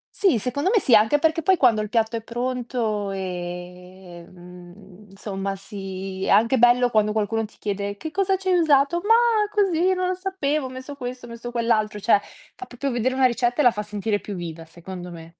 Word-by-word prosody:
Sì, 375 Hz, -, +3 dB
secondo 260 Hz, -, -1 dB
me 445 Hz, -, +4 dB
sì, 260 Hz, -, +1 dB
anche 220 Hz, +7 st, +4 dB
perché 320 Hz, +1 st, +1 dB
poi 375 Hz, +4 st, +3 dB
quando 235 Hz, -7 st, +3 dB
il 210 Hz, -, -5 dB
piatto 225 Hz, 0 st, 0 dB
è 225 Hz, -, -3 dB
pronto 240 Hz, -3 st, -3 dB
ehm, 180 Hz, +1 st, -9 dB
insomma 195 Hz, 0 st, -5 dB
si, 195 Hz, -1 st, -7 dB
è -, -, -2 dB
anche 230 Hz, +5 st, +4 dB
bello 245 Hz, 0 st, +4 dB
quando 215 Hz, -1 st, +2 dB
qualcuno 220 Hz, +1 st, -1 dB
ti 215 Hz, -, -16 dB
chiede: 200 Hz, 0 st, -4 dB
"Che 315 Hz, +8 st, -6 dB
cosa 385 Hz, +1 st, +1 dB
ci 380 Hz, -, -8 dB
hai 360 Hz, -1 st, +4 dB
usato?" 290 Hz, 0 st, +3 dB
"Ma 450 Hz, -1 st, +3 dB
così 375 Hz, -4 st, +2 dB
non 365 Hz, -, -1 dB
lo -, -, +1 dB
sapevo, 310 Hz, -7 st, -2 dB
ho -, -, -9 dB
messo 260 Hz, +2 st, -8 dB
questo, 250 Hz, -2 st, -7 dB
ho -, -, -12 dB
messo 235 Hz, +1 st, -7 dB
quell'altro". 230 Hz, -3 st, 0 dB
Cioè, 205 Hz, 0 st, +3 dB, 0.3 s
fa 380 Hz, -, -9 dB
proprio 270 Hz, +3 st, -4 dB
vedere 250 Hz, +2 st, 0 dB
una 265 Hz, -, +3 dB
ricetta 245 Hz, +2 st, +1 dB
e -, -, +2 dB
la 245 Hz, -, +6 dB
fa 210 Hz, -, -4 dB
sentire 210 Hz, 0 st, -2 dB
più 205 Hz, -, -7 dB
viva 165 Hz, -2 st, -7 dB
secondo 175 Hz, +2 st, -9 dB
me. 165 Hz, -1 st, -11 dB
225 Hz, 205 wpm, -23 LUFS, 195-275 Hz, 0.3 s, la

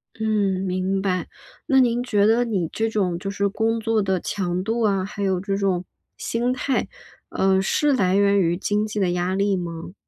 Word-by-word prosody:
嗯， 205 Hz, -4 st, 0 dB
明 190 Hz, +1 st, -1 dB
白。 185 Hz, -2 st, -1 dB, 0.4 s
那 265 Hz, -3 st, +4 dB
您 245 Hz, -1 st, +2 dB
觉 210 Hz, -5 st, +2 dB
得 230 Hz, +3 st, +4 dB
你 195 Hz, -8 st, -1 dB
这 225 Hz, 0 st, 0 dB
种 185 Hz, -6 st, 0 dB
就 195 Hz, -, -4 dB
是 200 Hz, 0 st, 0 dB
工 225 Hz, +3 st, 0 dB
作 225 Hz, -1 st, +1 dB
的 190 Hz, -2 st, 0 dB
强 180 Hz, -1 st, -2 dB
度 225 Hz, +3 st, -1 dB
啊， 195 Hz, -3 st, +1 dB
还 205 Hz, 0 st, -7 dB
有 190 Hz, -2 st, +1 dB
这 195 Hz, +1 st, -2 dB
种 190 Hz, -3 st, 0 dB, 0.3 s
心 240 Hz, +2 st, -1 dB
态， 255 Hz, +1 st, -1 dB, 0.4 s
呃， 190 Hz, 0 st, +2 dB
是 290 Hz, +8 st, +2 dB
来 190 Hz, -6 st, +2 dB
源 200 Hz, 0 st, +4 dB
于 175 Hz, -1 st, +1 dB
经 205 Hz, +2 st, 0 dB
济 210 Hz, 0 st, -4 dB
的 180 Hz, -2 st, +1 dB
压 180 Hz, +1 st, -1 dB
力 200 Hz, 0 st, +1 dB
吗？ 170 Hz, 0 st, -6 dB
200 Hz, 210 characters per minute, -23 LUFS, 185-220 Hz, 0.4 s, 那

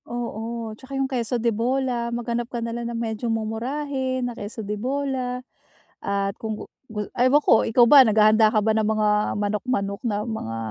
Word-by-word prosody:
Oo, 230 Hz, -1 st, -4 dB
tsaka 260 Hz, +5 st, -8 dB
yung 270 Hz, -, +1 dB
queso 245 Hz, -2 st, -1 dB
de 230 Hz, 0 st, +1 dB
bola, 245 Hz, +1 st, 0 dB
maghanap 235 Hz, 0 st, -3 dB
ka 245 Hz, -, -5 dB
na 230 Hz, 0 st, -3 dB
lang 235 Hz, 0 st, -4 dB
ng 235 Hz, -, -4 dB
medyo 230 Hz, 0 st, -3 dB
mumurahin 255 Hz, +4 st, -2 dB
na 245 Hz, -, -3 dB
queso 220 Hz, +1 st, -7 dB
de 210 Hz, -, -3 dB
bola, 255 Hz, +1 st, -2 dB, 0.6 s
at 200 Hz, 0 st, -1 dB
kung 220 Hz, -1 st, -3 dB
gu -, -, -8 dB, 0.2 s
gu 210 Hz, -2 st, -4 dB
ewan 255 Hz, +4 st, +4 dB
ko, 225 Hz, -, +6 dB
ikaw 240 Hz, +2 st, +5 dB
ba, 285 Hz, -2 st, +10 dB
naghahanda 215 Hz, 0 st, +5 dB
ka 215 Hz, -, +4 dB
ba 220 Hz, -, +3 dB
ng 215 Hz, -1 st, +1 dB
mga 215 Hz, -1 st, +2 dB, 0.3 s
manok, 205 Hz, 0 st, -1 dB
manok, 200 Hz, -5 st, -1 dB
na 210 Hz, -1 st, -1 dB
mga 220 Hz, -, -4 dB
230 Hz, 190 wpm, -24 LUFS, 215-250 Hz, 0.6 s, ba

